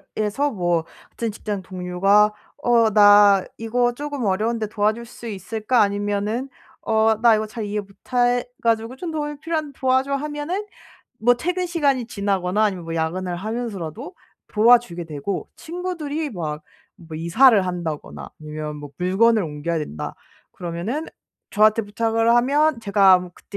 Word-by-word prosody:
일에서 215 +7 0
뭐 175 -5 0 0.2
같은 230 -1 -4
직장 205 -1 -5
동료가 190 +3 +2 0.3
"어 230 -2 +4
나 205 -2 +7
이거 240 +2 0
쪼금 290 -1 -5
어려운데 215 +3 0
도와줄 215 +2 -1
수 235 0 -11
있을까?" 220 +4 0
아니면은 205 +5 -1 0.3
"어 220 0 +2
나 230 -2 +6
이거 215 0 -1
잘 215 0 -6
이해 210 0 -2
못 200 - -17 0.2
해 245 0 +2 0.2
가지고 230 +2 0
좀 335 +4 -5
도움이 295 -2 -4
필요한데 310 -4 -3
도와줘." 260 +1 +1
하면은 300 +8 -3 0.6
뭐 245 +2 +5
퇴근 360 +7 -2
시간이 280 -8 0
지나거나 200 -1 0
아니면 190 -5 -1
뭐 165 - -5
야근을 175 +3 -2
하면서라도 220 - -5 0.3
도와주게 220 -6 +3
되고 155 +5 -5
친구들이 320 -3 -4
막 155 -6 -5 0.4
뭐 160 -2 -9
이사를 200 +6 +5
한다거나 170 -4 -5
아니면 150 0 -6
뭐 145 -1 -9
물건을 210 +5 +3
옮겨야 155 +2 -3
된다. 145 - -6 0.3
그러면은 180 - -4 0.4
저한테 215 +2 +4
부탁을 225 +2 +1
하면 280 +3 +2
제가 200 -3 +5
뭐 180 - -9
그때 200 - -10
215 Hz, 325 characters per minute, -22 LUFS, 185-245 Hz, 0.6 s, 나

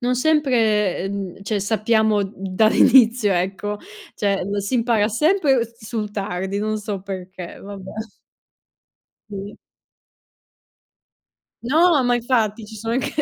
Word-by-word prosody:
non 250 +1 +1
sempre, 230 - +2
uhm, 195 -2 -5
cioè 205 0 -1
sappiamo 220 0 +2
dall' 195 +2 0
inizio, 235 -4 +5
ecco, 195 +3 -2 0.4
cioè 200 -2 0
o 200 +2 -2
si 200 +5 -2
impara 230 -3 +2
sempre 275 - +2
s 230 0 -17
sul 215 -2 -4
tardi, 195 -1 -3
non 215 +1 -1
so 205 -2 -5
perché, 185 -2 -8
vabbè. 195 -1 -9 1.4
Sì. 200 +1 -7 2.1
No, 315 +3 +4
ma 245 -1 +2
infatti 225 -3 0
ci 220 - -11
sono 225 +2 -3
anche 255 - -1
215 Hz, 125 wpm, -21 LUFS, 200-235 Hz, 2.1 s, inizio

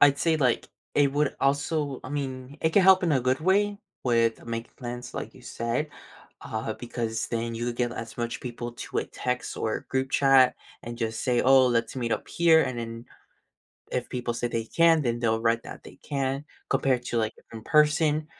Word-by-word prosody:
I'd 140 -1 +6
say, 165 -1 +2
like, 130 -5 +1 0.3
it 140 -2 +3
would 145 0 0
also 145 0 0
I - - -6
mean, 135 -1 -5
it 160 - +2
can 200 - +4
help 190 +1 +7
in 170 -4 +2
a 130 - +3
good 130 +2 +1
way 200 +4 +2 0.3
with 115 -2 +2
making 115 0 -5
plans, 120 -1 -6
like - - -5
you - - -15
said, 115 +6 -2 0.5
uh, 110 0 -4
because 115 -2 -3
then 115 0 -2
you 120 +1 -2
get 120 0 -1
as 115 -1 -7
much 120 0 -3
people 120 -1 -6
to - - -4
a - - 0
text 125 -1 -3
or 110 - -2
group 130 0 0
chat 135 -2 +5 0.3
and 120 0 -7
just 110 -1 -2
say, 125 -2 +2
"Oh, 130 0 +6
let's 120 -2 0
meet 120 -2 -2
up - - -2
here," 165 -1 +5
and 120 - -3
then 115 0 -6 0.9
if 125 - -2
people 120 -2 -3
say 120 - -2
they 115 -1 -2
can, 165 +6 +4
then 120 -2 -1
they'll 115 -1 +1
write 115 0 +1
that - - -10
they - - -12
can 135 0 -2 0.3
compared 130 -3 +1
to, 120 - -1
like, 110 0 -1 0.2
in 110 -1 -8
person. 150 +1 +3
125 Hz, 200 wpm, -27 LUFS, 115-145 Hz, 0.9 s, help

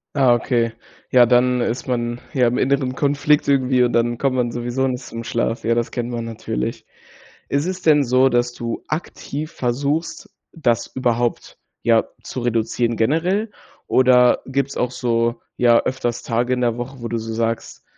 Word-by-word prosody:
Ah, 130 -4 +5
okay. 120 -1 +1 0.4
Ja, 125 -1 +7
dann 125 +1 +3
ist 120 +1 -2
man, 120 -1 -2
ja, 125 -4 +3
im 120 - 0
inneren 130 -1 +1
Konflikt 145 +1 +2
irgendwie. 130 -2 +3
Und 120 - +1
dann 120 0 +1
kommt 135 0 0
man 120 -2 0
sowieso 120 +3 -1
nicht 125 0 -3
zum 115 -1 -7
Schlaf. 115 0 -2
Ja, 115 +1 +2
das 120 0 -1
kennt 120 -1 -3
man 120 -1 -4
natürlich. 110 - -4 0.6
Ist 140 +2 0
es 185 0 -4
denn 150 -4 +4
so, 130 +1 +3
dass 120 0 +1
du 115 -1 -5
aktiv 155 -1 -5
versuchst, 140 +6 -2 0.2
das 120 -8 0
überhaupt, 120 -2 -2 0.2
ja, 115 -1 +4 0.2
zu 130 - -5
reduzieren 115 0 0
generell? 180 - +1 0.4
Oder 125 -1 +4
gibt's 135 +1 -2
auch 125 - 0
so, 115 -1 0 0.2
ja, 120 -1 +5
öfters 120 -2 -2
Tage 120 +2 0
in 125 - -1
der 120 -1 +1
Woche, 125 +2 -7
wo 115 - -3
du 115 - -2
so 115 0 -5
sagst: 115 0 -3
125 Hz, 175 wpm, -21 LUFS, 120-135 Hz, 0.6 s, Ja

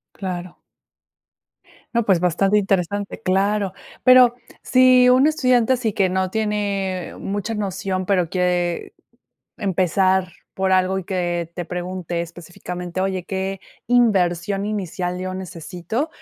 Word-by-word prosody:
Claro. 180 -2 -6 1.3
No, 235 -1 +2
pues 190 -5 +3
bastante 190 +4 +2
interesante, 195 +1 -1
claro. 195 0 +1 0.3
Pero 255 -2 +7 0.3
si 255 -1 +5
un 255 +3 +5
estudiante 255 -5 +3
así 235 -4 0
que 195 -1 +2
no 185 0 -1
tiene 200 -3 -2
mucha 205 +3 -3
noción, 195 -2 -3
pero 180 -4 +1
quiere 180 -2 -1 0.6
empezar 185 -1 +1 0.2
por 190 0 0
algo 185 +1 +2
y 190 - -6
que 175 -2 -2
te 175 -2 -5
pregunte 180 -1 -4
específicamente: 175 +1 -6
“Oye, 190 -2 -2
¿qué 190 0 -3 0.3
inversión 195 -5 +2
inicial 185 -3 -3
yo 185 0 -4
necesito?”, 185 - -4
190 Hz, 120 wpm, -21 LUFS, 180-210 Hz, 1.3 s, Pero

